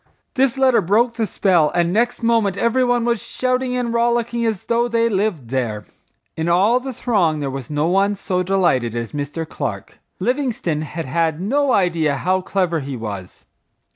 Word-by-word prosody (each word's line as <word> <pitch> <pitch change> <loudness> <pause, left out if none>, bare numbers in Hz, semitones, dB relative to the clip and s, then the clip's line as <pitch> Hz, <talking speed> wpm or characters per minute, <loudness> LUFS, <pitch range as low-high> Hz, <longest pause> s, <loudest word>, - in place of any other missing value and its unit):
This 265 0 +1
letter 260 -4 +4
broke 220 +7 +2
the 225 -2 -1
spell 175 -5 +2
and 175 0 +1
next 240 +3 0
moment 225 -4 +2
every 235 +4 +2
one 245 -1 +1
was 235 -3 0
shouting 255 0 -1
and 240 -2 -2
rollicking 235 0 +1
as 220 -5 -2
though 235 +1 +1
they 230 -1 +1
lived 190 - -1
there. 115 -5 -2 0.5
In 160 +1 -2
all 200 +8 +4
the 265 +1 -6
throng 195 -11 0
there 140 -2 -3
was 135 -2 -6
no 150 0 0
one 195 +4 +2
so 185 -2 -2
delighted 170 - +1
as 115 -1 -4
Mr. 150 +2 -4
Clark. 110 -11 -5 0.2
Livingstone 240 - -1
had 165 +2 -5
had 160 +3 0
no 270 +8 +1
idea 170 - +2
how 185 +6 0
clever 180 -3 0
he 135 -2 -5
was. 100 -5 -7
190 Hz, 175 wpm, -20 LUFS, 155-235 Hz, 0.5 s, letter